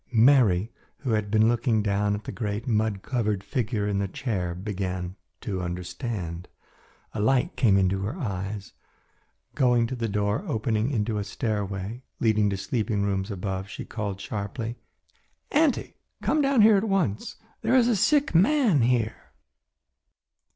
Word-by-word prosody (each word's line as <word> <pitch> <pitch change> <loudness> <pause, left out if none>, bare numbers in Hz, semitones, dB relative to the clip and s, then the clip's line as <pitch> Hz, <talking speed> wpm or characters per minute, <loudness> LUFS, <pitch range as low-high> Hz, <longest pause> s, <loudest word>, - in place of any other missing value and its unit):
Mary, 115 -5 +5 0.3
who 130 - -2
had 105 -2 0
been 110 +1 +4
looking 115 -2 +2
down 105 0 +1
at 105 - -7
the - - -5
great 105 +1 -3
mud 110 -4 0
covered 105 -6 -1
figure 110 -4 -1
in 100 -1 0
the 100 - 0
chair 95 -4 -3
began 95 -2 -4 0.2
to 95 -3 -3
understand. 90 0 -4 0.7
A - - -4
light 125 +4 +2
came 115 -6 +4
into 95 0 +2
her 110 - -3
eyes. 100 - -4 0.8
Going 125 -2 +3
to 130 +3 -4
the 115 -2 -2
door 105 - 0
opening 110 -3 0
into 110 -4 -1
a - - -1
stairway 100 +1 -3 0.2
leading 110 -2 +3
to 100 - -2
sleeping 105 0 -1
rooms 95 0 -1
above, 95 -1 -4
she - - -7
called 100 -4 -4
sharply, 110 +4 -4 0.8
"Auntie, 300 -4 +2 0.3
come 310 - +2
down 275 -5 +4
here 215 -1 +7
at 195 - +1
once. 165 - 0 0.3
There 230 +3 +2
is 245 -2 +5
a 240 - +3
sick 290 - +3
man 205 - +4
here." 115 -2 0
110 Hz, 150 wpm, -26 LUFS, 100-125 Hz, 0.8 s, here